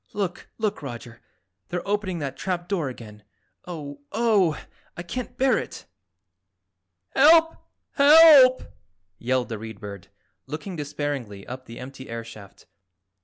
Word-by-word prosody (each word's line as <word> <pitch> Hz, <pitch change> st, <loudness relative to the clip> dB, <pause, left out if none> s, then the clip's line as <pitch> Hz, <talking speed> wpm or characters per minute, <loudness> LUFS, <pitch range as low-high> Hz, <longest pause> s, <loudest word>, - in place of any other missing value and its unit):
Look, 195 Hz, -4 st, -4 dB
look, 215 Hz, -2 st, -2 dB
Roger, 120 Hz, -3 st, -9 dB, 0.5 s
they're 175 Hz, +1 st, -4 dB
opening 200 Hz, -3 st, -1 dB
that 140 Hz, -4 st, -4 dB
trap 175 Hz, -2 st, -3 dB
door 175 Hz, -8 st, -1 dB
again. 105 Hz, -4 st, -11 dB, 0.5 s
Oh, 145 Hz, -5 st, -7 dB
Oh! 205 Hz, -7 st, +2 dB, 0.4 s
I 170 Hz, -, -5 dB
can't 245 Hz, +7 st, -6 dB
bear 265 Hz, 0 st, +3 dB
it!" -, -, -8 dB, 1.2 s
"Help! 325 Hz, -, +5 dB, 0.4 s
Help!" 285 Hz, -3 st, +7 dB, 0.6 s
yelled 125 Hz, +1 st, -1 dB
the 110 Hz, -2 st, -5 dB
Read 110 Hz, -2 st, -9 dB
Bird, 100 Hz, -3 st, -9 dB, 0.4 s
looking 155 Hz, +6 st, -6 dB
despairingly 145 Hz, -, -5 dB
up 130 Hz, +1 st, -8 dB
the 115 Hz, -, -10 dB
empty 130 Hz, +1 st, -10 dB
air 115 Hz, 0 st, -5 dB
shaft. 110 Hz, -3 st, -14 dB
150 Hz, 125 wpm, -24 LUFS, -, 1.2 s, Help